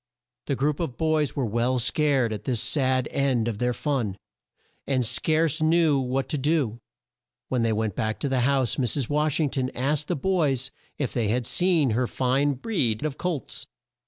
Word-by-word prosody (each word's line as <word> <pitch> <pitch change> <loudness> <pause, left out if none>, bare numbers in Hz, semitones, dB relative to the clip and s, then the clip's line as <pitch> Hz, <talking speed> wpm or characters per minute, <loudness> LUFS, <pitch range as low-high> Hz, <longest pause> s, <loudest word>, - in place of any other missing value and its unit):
The 140 - 0
group 145 +3 0
of 150 -8 -3
boys 155 -3 +1
were 135 - 0
well 120 +4 0
scared 130 -2 +1
at 105 - -7
this 125 -4 0
sad 130 -1 +1
end 130 -5 +1
of 110 -3 -3
their 125 0 +1
fun, 120 -7 -2 0.7
and 130 -3 +1
scarce 155 +5 +1
knew 160 -2 +3
what 130 +1 -1
to 150 - -1
do. 135 -6 0 0.7
When 125 -2 0
they 115 -1 +2
went 110 -1 -1
back 110 +2 -2
to - - 0
the 135 -1 +1
house 130 -1 +1
Mrs. 125 0 0
Wash 150 +1 +1
ing 150 -4 +1
ton 130 -2 -1
asked 145 +4 0
the - - 0
boys 140 -6 0 0.3
if 140 -5 -2
they 115 -4 0
had 120 +3 0
seen 170 -4 +2
her 120 +3 +1
fine 135 +4 +1
breed 135 - -1
of 150 -2 -4
colts. 170 -9 -4
135 Hz, 185 wpm, -25 LUFS, 120-150 Hz, 0.7 s, knew